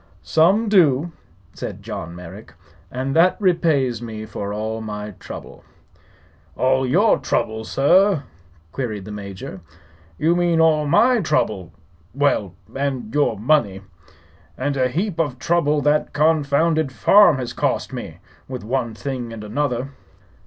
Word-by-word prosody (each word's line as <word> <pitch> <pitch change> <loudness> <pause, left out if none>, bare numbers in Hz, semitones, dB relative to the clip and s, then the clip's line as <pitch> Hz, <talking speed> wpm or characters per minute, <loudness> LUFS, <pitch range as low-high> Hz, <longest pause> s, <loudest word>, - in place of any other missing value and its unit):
"Some 180 - +3
do," 170 -6 +3 0.4
said - - -7
John 85 +1 -6
Merrick; 90 -1 -11 0.3
"and 130 +4 -3
that 175 +3 +4
repays 155 - +1
me 110 -2 -6
for 100 -1 -5
all 110 +2 -3
my 105 -1 -6
trouble." - - -10 0.9
"All 130 0 +2
your 195 - +3
throuble, 110 0 -2
sir?" 180 +3 +3 0.5
queried 110 -6 -4
the 105 - -8
Major; 100 -2 -8 0.6
"you 165 - +2
mane 175 -2 +2
all 155 -2 +3
my 235 - +4
throuble 110 - -1 0.5
well, 120 -10 +1 0.2
and 135 -5 -3
your 145 -7 +1
money. 105 -5 +1 0.7
And 140 +2 -1
a 130 -1 +1
heap 175 - -2
of 145 -6 -1
throuble 150 -1 +1
that 150 +1 +1
confounded 155 0 +2
farm 200 +3 +5
has 120 -2 -4
cost - - -1
me, - - -7 0.3
with 130 -3 -6
one 120 0 -2
thing 125 +1 -5
and 110 -2 -8
another." 125 +3 -2
135 Hz, 130 wpm, -21 LUFS, 110-160 Hz, 0.9 s, farm